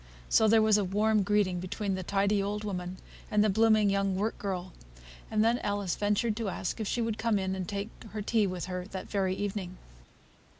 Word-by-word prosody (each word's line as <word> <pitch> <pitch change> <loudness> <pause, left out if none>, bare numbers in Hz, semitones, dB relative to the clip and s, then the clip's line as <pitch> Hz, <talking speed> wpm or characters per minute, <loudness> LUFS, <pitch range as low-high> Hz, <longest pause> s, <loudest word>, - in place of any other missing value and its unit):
So 220 - +5
there 220 0 +5
was 215 -1 +4
a - - +1
warm 210 +3 +2
greeting 200 -2 +1
between 195 +2 -3
the 185 - -2
tidy 200 +2 +1
old 205 +2 -2
woman 185 -3 -4 0.3
and 210 0 +3
the 215 - +3
blooming 215 -1 +4
young 195 -1 +1
work 210 +4 -1
girl; 185 -3 -4 0.6
and 215 -1 +2
then 235 +2 +3
Alice 200 -3 -1
ventured 210 +2 +1
to 225 -3 -2
ask 185 - -3
if 215 - -2
she 235 - 0
would 225 -1 -2
come 225 -2 +2
in 190 -1 -1
and 185 -2 -4
take 200 +2 -4 0.2
her 210 -1 -5
tea 220 -1 +2
with 180 -2 -4
her 180 -1 -4
that 190 -1 -7
very 190 -2 +1
evening. 190 -2 -4
205 Hz, 210 wpm, -30 LUFS, 190-215 Hz, 0.6 s, So